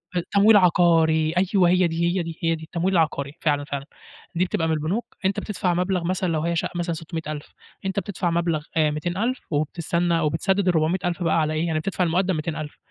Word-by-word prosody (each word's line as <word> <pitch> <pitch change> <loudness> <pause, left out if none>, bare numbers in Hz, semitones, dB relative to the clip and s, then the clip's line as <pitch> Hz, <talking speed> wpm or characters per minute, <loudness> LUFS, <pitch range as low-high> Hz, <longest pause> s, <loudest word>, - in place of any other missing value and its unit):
ت 175 - 0
تمويل 205 +1 +6
عقاري 165 -3 +4
أيوه، 185 -1 +3
هي 180 0 +4
دي، 165 +1 -1
هي 175 - 0
دي، 165 -1 -7
هي 165 0 +2
دي، 160 - -10
التّمويل 175 +4 -1
العقاري 150 -4 0
فعلًا، 145 -2 +1
فعلًا، 140 -1 -5 0.5
دي 180 +2 +2
بتبقى 175 -4 -1
من 160 - +1
البنوك، 180 +10 -3
أنت 190 +1 +1
بتدفع 185 -4 -1
مبلغ 180 0 0
مثلًا 185 0 -1
لو 155 - 0
هي 170 +1 -1
شقة 165 - -1
مثلًا 175 -1 -1
600.0000 155 -2 -6 0.4
أنت 190 +1 0
بتدفع 185 -2 -2
مبلغ 170 -3 0
آآ 155 -1 +3
200.000 185 - -2
وبتستنى 170 +3 0
وبتسدِّد 185 +5 0
ال400.000 175 +2 +1
بقى 165 0 +2
على 155 0 0
إيه، 160 +2 -1
يعني 155 -1 0
بتدفع 185 +2 -1
المُقدم 180 +2 +1
200.000 155 -1 -4
170 Hz, 195 wpm, -23 LUFS, 160-185 Hz, 0.5 s, تمويل